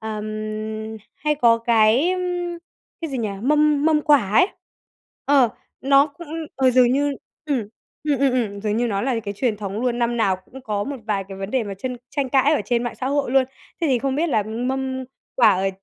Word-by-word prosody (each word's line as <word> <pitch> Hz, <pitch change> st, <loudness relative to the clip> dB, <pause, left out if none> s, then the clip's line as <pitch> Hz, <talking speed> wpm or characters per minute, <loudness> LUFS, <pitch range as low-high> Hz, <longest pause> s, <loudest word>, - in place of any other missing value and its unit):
ừm, 215 Hz, 0 st, -5 dB, 0.2 s
hay 300 Hz, 0 st, 0 dB
có 235 Hz, -5 st, +4 dB
cái, 230 Hz, +6 st, +3 dB
ừm, 355 Hz, -1 st, -2 dB, 0.4 s
cái 325 Hz, -2 st, -4 dB
gì 265 Hz, -, -3 dB
nhỉ, 225 Hz, -2 st, -1 dB
mâm 300 Hz, +2 st, +3 dB
mâm 310 Hz, -1 st, +4 dB
quả 285 Hz, -11 st, +4 dB
ấy. 285 Hz, -, +5 dB, 0.8 s
Ờ, 275 Hz, -4 st, +5 dB, 0.3 s
nó 275 Hz, +1 st, +5 dB
cũng 310 Hz, +3 st, -12 dB, 0.3 s
ờ, 265 Hz, -1 st, +4 dB
dường 250 Hz, -1 st, +4 dB
như 285 Hz, +2 st, +1 dB, 0.3 s
ừm, 265 Hz, -9 st, -1 dB, 0.4 s
ừm, 290 Hz, -3 st, +1 dB
ừm, 275 Hz, 0 st, +3 dB
ừm, 215 Hz, -5 st, -1 dB
dường 210 Hz, 0 st, -1 dB
như 240 Hz, +1 st, +1 dB
nó 200 Hz, -3 st, -1 dB
là 250 Hz, -3 st, 0 dB
cái 200 Hz, -1 st, -4 dB
truyền 225 Hz, 0 st, 0 dB
thống 205 Hz, 0 st, -4 dB
luôn, 245 Hz, -1 st, 0 dB
năm 240 Hz, 0 st, 0 dB
nào 195 Hz, -5 st, +2 dB
cũng 250 Hz, +8 st, -14 dB
có 210 Hz, -4 st, -2 dB
một 280 Hz, 0 st, -4 dB
vài 200 Hz, -3 st, -1 dB
cái 195 Hz, -1 st, -8 dB
vấn 195 Hz, +1 st, -5 dB
đề 255 Hz, -2 st, 0 dB
mà 200 Hz, -1 st, -5 dB
trên 250 Hz, +4 st, -4 dB
tranh 280 Hz, -3 st, -1 dB
cãi 270 Hz, +3 st, +3 dB
ở -, -, +1 dB
trên 235 Hz, +2 st, 0 dB
mạng 240 Hz, -, -3 dB
xã 255 Hz, -, -1 dB
hội 280 Hz, -1 st, 0 dB
luôn. 265 Hz, 0 st, +4 dB, 0.4 s
Thế 335 Hz, -, +1 dB
thì 260 Hz, -4 st, +2 dB
không 265 Hz, +2 st, -1 dB
biết 325 Hz, +5 st, +1 dB
là 220 Hz, -7 st, +2 dB
mâm 260 Hz, +4 st, -3 dB, 0.3 s
quả 235 Hz, -4 st, +6 dB
ở, 190 Hz, +1 st, 0 dB
250 Hz, 215 wpm, -22 LUFS, 215-280 Hz, 0.8 s, quả